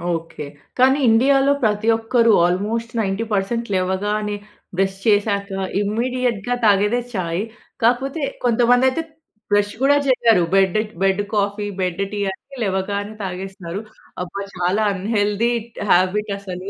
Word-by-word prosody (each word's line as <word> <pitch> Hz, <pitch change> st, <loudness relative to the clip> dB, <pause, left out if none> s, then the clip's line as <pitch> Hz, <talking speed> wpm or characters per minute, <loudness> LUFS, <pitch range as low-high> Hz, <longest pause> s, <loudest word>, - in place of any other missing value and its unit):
Okay. 165 Hz, -2 st, -6 dB, 0.3 s
కానీ 265 Hz, +2 st, +5 dB
ఇండియాలో 270 Hz, +4 st, +4 dB
ప్రతి 215 Hz, 0 st, +1 dB
ఒక్కరు 230 Hz, 0 st, +3 dB
ఆల్మోస్ట్ 215 Hz, +6 st, -1 dB
90% 210 Hz, +2 st, -1 dB
లేవగానే 205 Hz, +3 st, -1 dB, 0.4 s
బ్రష్ 195 Hz, 0 st, 0 dB
చేశాక 205 Hz, -1 st, +2 dB, 0.3 s
ఇమిడియేట్‌గా 240 Hz, +1 st, -1 dB
తాగేదే 210 Hz, +3 st, +3 dB
చాయ్. 175 Hz, -2 st, -2 dB, 0.4 s
కాకపోతే, 265 Hz, +6 st, +1 dB, 0.2 s
కొంతమంది 245 Hz, +1 st, +4 dB
అయితే 295 Hz, +5 st, -2 dB, 0.5 s
బ్రష్ 205 Hz, 0 st, +2 dB
కూడా 280 Hz, +2 st, +5 dB
చెయ్యరు. 230 Hz, -7 st, +4 dB
Bed 195 Hz, -1 st, +3 dB, 0.3 s
bed 195 Hz, +1 st, +2 dB
coffee 205 Hz, 0 st, 0 dB
bed 180 Hz, +1 st, -1 dB
tea 210 Hz, -, -4 dB
అని 270 Hz, +8 st, -13 dB
లేవగానే 200 Hz, +1 st, -2 dB
తాగేస్తారు. 190 Hz, 0 st, -5 dB, 0.4 s
అబ్బా! 200 Hz, +3 st, -6 dB
చాలా 180 Hz, +5 st, +1 dB
అన్‌హెల్తీ 205 Hz, +3 st, 0 dB, 0.4 s
హాబిట్ 190 Hz, +4 st, +2 dB
అసలు. 185 Hz, -1 st, -7 dB
205 Hz, 115 wpm, -20 LUFS, 195-230 Hz, 0.5 s, కానీ